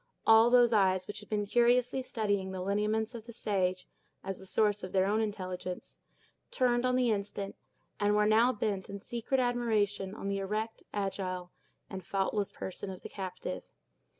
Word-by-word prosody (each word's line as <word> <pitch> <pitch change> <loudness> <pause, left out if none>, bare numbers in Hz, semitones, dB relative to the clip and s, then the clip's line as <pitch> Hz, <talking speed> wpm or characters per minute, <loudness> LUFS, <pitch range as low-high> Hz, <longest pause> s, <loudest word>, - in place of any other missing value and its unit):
All 225 +1 +7
those 240 -1 +6
eyes, 190 -3 +3
which 205 - -6
had 210 - -13
been 210 -1 0
curiously 245 +4 +3
studying 205 -6 -1
the 190 -1 -4
lineaments 210 +4 0
of 230 -1 -8
the - - -7
sage, 185 -5 -1 0.4
as 195 0 -4
the 190 - -11
source 210 +1 +2
of 185 - -6
their 190 -1 +4
own 210 +3 +2
intelligence, 185 -4 -5 0.5
turned 250 -1 +2
on 250 - +2
the 250 -2 +3
instant, 200 -1 -3 0.4
and 205 0 +3
were 210 0 +4
now 225 +4 +5
bent 205 -4 -2
in 200 0 -6
secret 240 +5 -2
admiration 215 -5 0
on 200 - -5
the 200 0 -1
erect, 215 +3 -3
agile, 185 -3 -3 0.4
and 190 -1 -7
faultless 195 +2 -1
person 190 +1 -6
of 185 -1 -8
the - - -7
captive. 185 - -5
205 Hz, 175 wpm, -31 LUFS, 190-225 Hz, 0.5 s, All